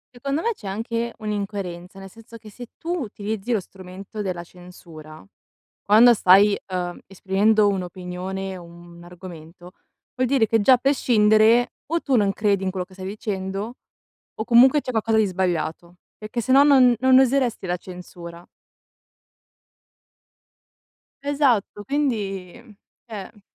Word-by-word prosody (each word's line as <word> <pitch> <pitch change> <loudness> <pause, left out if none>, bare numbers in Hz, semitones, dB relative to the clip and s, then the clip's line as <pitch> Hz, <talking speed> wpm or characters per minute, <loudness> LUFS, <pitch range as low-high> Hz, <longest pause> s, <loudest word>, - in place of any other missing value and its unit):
Secondo 275 +5 -3
me 465 0 0
c'è 210 - -11
anche 230 +3 -3
un'incoerenza, 200 -3 -5
nel 195 0 -10
senso 225 +2 -14
che 215 -1 -14
se 240 +3 -11
tu 345 0 -3
utilizzi 215 -1 -5
lo 225 - +2
strumento 190 +3 -10
della 175 -3 -4
censura, 165 -4 -14 0.6
quando 225 +4 +6
stai, 200 0 +5 0.2
uhm, 180 -1 -4
esprimendo 205 +3 +1
un'opinione, 185 +1 -5
un 170 0 -14
argomento, 175 -1 -12 0.4
vuol 255 -1 -1
dire 260 -5 +2
che 225 0 +1
già 255 +5 +6
a - - +4
prescindere 235 -3 +3
o 335 +3 -1
tu 270 -3 +1
non 200 -2 +1
credi 200 -2 0
in 190 - -1
quello 185 -1 -4
che 190 - -23
stai 185 0 -9
dicendo 200 +1 -5 0.6
o 220 - -5
comunque, 255 +5 +5
c'è - - -8
qualcosa 225 -2 0
di 215 - +3
sbagliato, 175 -2 -3 0.2
perché 215 +3 -5
sennò 265 +4 +5
non 260 -4 +5
non 260 0 +5
useresti 255 -6 +1
la 180 - -1
censura. 175 -1 -11 2.8
Esatto, 265 -8 0
quindi 205 -9 -2
uhm, 225 -4 -18 0.3
cioè 210 -1 -9
205 Hz, 140 wpm, -22 LUFS, 185-235 Hz, 2.8 s, quando